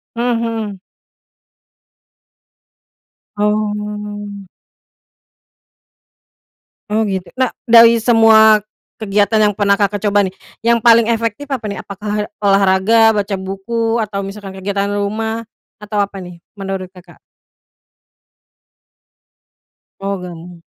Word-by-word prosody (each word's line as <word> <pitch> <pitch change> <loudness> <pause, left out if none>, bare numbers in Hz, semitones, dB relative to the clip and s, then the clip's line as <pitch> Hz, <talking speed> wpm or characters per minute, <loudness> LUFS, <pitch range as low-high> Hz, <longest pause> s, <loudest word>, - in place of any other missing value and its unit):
Mmm, 235 0 0
mhm. 220 -4 -4 2.6
Oh. 210 -1 -3 2.5
Oh 220 +1 +1
gitu, 190 -3 -4
nah, 255 -2 0 0.2
dari 230 0 +7
semua 220 -2 +5 0.3
kegiatan 210 0 +1
yang 210 -1 +3
pernah 200 0 +2
Kakak 205 0 0
coba 205 0 +3
nih, 185 - -5 0.3
yang 235 0 +3
paling 230 0 +6
efektif 230 +3 -2
apa 260 - -3
nih? 200 - -5
Apakah 210 +1 -4 0.2
olahraga, 200 +3 +4
baca 205 -1 -1
buku, 225 +5 -2
atau 200 -2 -4
misalkan 195 -1 -9
kegiatan 200 +1 -2
rumah? 220 +3 -3 0.3
Atau 210 -1 -2
apa 200 0 -3
nih, 180 -2 -10 0.2
menurut 195 -1 -5
Kakak? 180 -2 -17 2.8
Oh 195 0 -2
gabung. 175 -1 -10
210 Hz, 100 wpm, -16 LUFS, 195-225 Hz, 2.8 s, dari